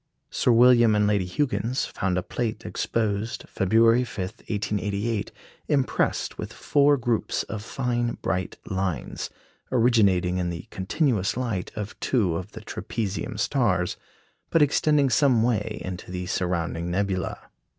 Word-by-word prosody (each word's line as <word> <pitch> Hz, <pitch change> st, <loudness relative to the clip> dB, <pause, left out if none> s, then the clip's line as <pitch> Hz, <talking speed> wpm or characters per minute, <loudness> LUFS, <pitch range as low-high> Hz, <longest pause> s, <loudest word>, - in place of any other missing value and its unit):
Sir -, -, +2 dB
William 120 Hz, -2 st, +6 dB
and 105 Hz, 0 st, +3 dB
Lady 100 Hz, -3 st, +1 dB
Huggins 120 Hz, +2 st, 0 dB
found 90 Hz, -2 st, -2 dB
a 90 Hz, -, -1 dB
plate 115 Hz, 0 st, -3 dB
exposed 110 Hz, 0 st, -2 dB
February 115 Hz, +5 st, +4 dB
5, 120 Hz, -, -9 dB, 0.3 s
1888, 105 Hz, +1 st, -2 dB, 0.4 s
impressed 135 Hz, -3 st, 0 dB
with -, -, -5 dB
four 145 Hz, 0 st, +3 dB
groups 120 Hz, -3 st, 0 dB
of 110 Hz, -, -6 dB
fine 120 Hz, 0 st, -1 dB
bright 90 Hz, +1 st, -2 dB
lines, 95 Hz, -8 st, -3 dB, 0.4 s
originating 100 Hz, -8 st, +3 dB
in 90 Hz, -1 st, -1 dB
the 85 Hz, -1 st, -6 dB
continuous 105 Hz, -, 0 dB
light 115 Hz, -8 st, -2 dB
of 105 Hz, -1 st, -6 dB
two 100 Hz, -10 st, +1 dB
of 95 Hz, +5 st, -5 dB
the -, -, -8 dB
trapezium 105 Hz, -2 st, -4 dB
stars, 105 Hz, -, +1 dB, 0.5 s
but 165 Hz, -, +5 dB
extending 145 Hz, -1 st, +3 dB
some 130 Hz, -6 st, +4 dB
way 110 Hz, -2 st, 0 dB
into 90 Hz, -1 st, -6 dB
the 90 Hz, 0 st, -4 dB
surrounding 85 Hz, -2 st, -1 dB
nebula. 95 Hz, +2 st, -1 dB
105 Hz, 130 wpm, -25 LUFS, 95-120 Hz, 0.5 s, William